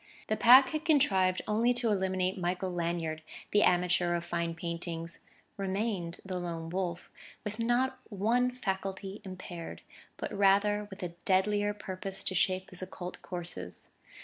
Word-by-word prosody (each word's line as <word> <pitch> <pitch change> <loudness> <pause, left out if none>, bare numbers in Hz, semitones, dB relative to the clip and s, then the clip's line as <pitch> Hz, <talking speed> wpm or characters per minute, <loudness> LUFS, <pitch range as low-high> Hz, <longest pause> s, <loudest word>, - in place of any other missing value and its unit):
The 215 - +3
Pack 255 +4 +8
had 310 +2 -2
contrived 195 - +3
only 230 +3 +3
to 240 -2 +1
eliminate 190 -1 +1
Michael 180 0 -2
Lanyard, 165 -2 -2 0.3
the 205 - +5
amateur 175 -1 +3
of 170 - -3
fine 170 -1 -2
paintings; 170 0 -5 0.4
remained 195 -3 -2
the 185 -1 -3
Lone 165 -2 -4
Wolf 175 -2 -3 0.3
with 210 0 -5
not 240 +3 +1
one 230 +5 +2
faculty 195 -4 -4
impaired, 180 -3 -7 0.3
but - - -4
rather 205 +1 +3
with 195 -1 -8
a 180 - -2 0.2
deadlier 205 +2 +2
purpose 190 -1 -6
to - - -1
shape 185 0 +1
his 185 - -4
occult 180 -1 -7
courses.... 170 - -7
190 Hz, 145 wpm, -31 LUFS, 175-210 Hz, 0.4 s, Pack